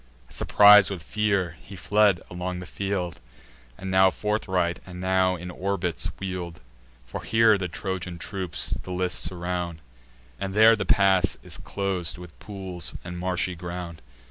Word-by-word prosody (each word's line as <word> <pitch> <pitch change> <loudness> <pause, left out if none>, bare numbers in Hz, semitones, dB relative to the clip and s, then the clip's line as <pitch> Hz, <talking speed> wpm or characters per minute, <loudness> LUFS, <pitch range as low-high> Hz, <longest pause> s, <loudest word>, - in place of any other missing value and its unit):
Surpris'd 105 -1 +7
with 95 -5 -5
fear, 100 -5 0
he 100 - -11
fled 100 +1 +3
along 90 +1 -4
the 90 - -7
field, 90 -4 -3 0.6
And 95 0 -5
now 95 0 +6
forthright, 95 -4 -1
and 90 -1 -10
now 95 0 +2
in 90 +1 -7
orbits 90 -2 -2
wheel'd; 90 -3 -5 0.5
For - - -6
here 110 -1 +4
the 95 -2 -2
Trojan 90 0 -5
troops 90 -1 -2
the - - -11
list 90 0 +1
surround, 90 -1 -3 0.6
And 95 0 -4
there 110 +1 +7
the 100 -3 -4
pass 95 -2 +3
is - - -8
clos'd 95 -4 -1
with 90 -3 -12
pools 95 -4 -4
and 90 0 -7
marshy 90 0 -1
ground. 85 -1 -7
90 Hz, 145 wpm, -25 LUFS, 90-100 Hz, 0.6 s, Surpris'd